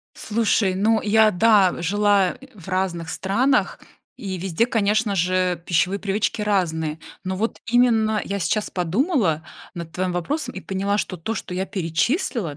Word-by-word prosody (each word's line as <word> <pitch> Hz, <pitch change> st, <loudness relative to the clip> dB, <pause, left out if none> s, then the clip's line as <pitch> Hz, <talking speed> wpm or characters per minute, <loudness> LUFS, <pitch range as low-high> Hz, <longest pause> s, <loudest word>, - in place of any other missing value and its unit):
Слушай, 215 Hz, -3 st, +1 dB
ну 215 Hz, +4 st, +2 dB
я, 215 Hz, +1 st, +4 dB
да, 205 Hz, -2 st, +3 dB
жила, 200 Hz, +1 st, +2 dB
э, 270 Hz, -, -13 dB
в 190 Hz, -4 st, -13 dB
разных 185 Hz, -3 st, -2 dB
странах 230 Hz, -, +1 dB, 0.4 s
и 190 Hz, -3 st, -5 dB
везде, 190 Hz, +5 st, 0 dB
конечно 215 Hz, -2 st, +1 dB
же, 180 Hz, -1 st, 0 dB
пищевые 185 Hz, +3 st, +1 dB
привычки 205 Hz, +2 st, -1 dB
разные. 160 Hz, -6 st, 0 dB, 0.3 s
Но 185 Hz, 0 st, -2 dB
вот 225 Hz, +4 st, -2 dB
именно 225 Hz, -3 st, +3 dB
я 200 Hz, 0 st, -3 dB
сейчас 210 Hz, +3 st, -1 dB
подумала 185 Hz, -, 0 dB, 0.3 s
над 170 Hz, -2 st, -7 dB
твоим 185 Hz, 0 st, -2 dB
вопросом 280 Hz, -, -2 dB
и 190 Hz, -, -6 dB
поняла, 195 Hz, +2 st, -1 dB
что 185 Hz, -, -3 dB
то, 180 Hz, +7 st, -4 dB
что 185 Hz, -, -6 dB
я 185 Hz, +1 st, -1 dB
перечислила: 190 Hz, -, -1 dB
195 Hz, 155 wpm, -22 LUFS, 180-220 Hz, 0.4 s, я